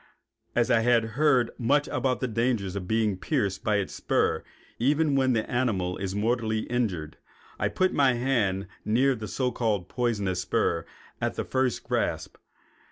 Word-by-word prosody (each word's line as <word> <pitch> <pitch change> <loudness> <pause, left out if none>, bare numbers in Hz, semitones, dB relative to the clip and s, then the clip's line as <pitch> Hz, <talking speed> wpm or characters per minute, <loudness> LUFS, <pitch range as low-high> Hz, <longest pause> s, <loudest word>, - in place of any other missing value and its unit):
As 120 -1 +2
I 115 - +5
had 115 -1 +3
heard 130 -4 +3
much 140 +5 +2
about 130 -2 0
the 130 - 0
danger 115 -2 0
of 95 -2 -4
being 110 -3 +1
pierced 95 +2 -1
by 105 - +2
its 100 -2 -1
spur - - 0 0.4
even 145 +4 +2
when 130 -2 +3
the 110 -2 0
animal 105 -8 0
is 95 0 -3
mortally 110 0 0
injured, 95 -12 -2 0.4
I - - +1
put 185 0 +1
my 135 -3 +4
hand 115 -6 0 0.2
near 130 +5 +3
the 110 -3 -6
so 125 +5 -1
called 105 -8 -1
poisonous 105 -7 -1
spur 90 - 0 0.3
at - - -1
the - - -3
first 130 -2 0
grasp. - - -2
115 Hz, 165 wpm, -27 LUFS, 100-130 Hz, 0.4 s, I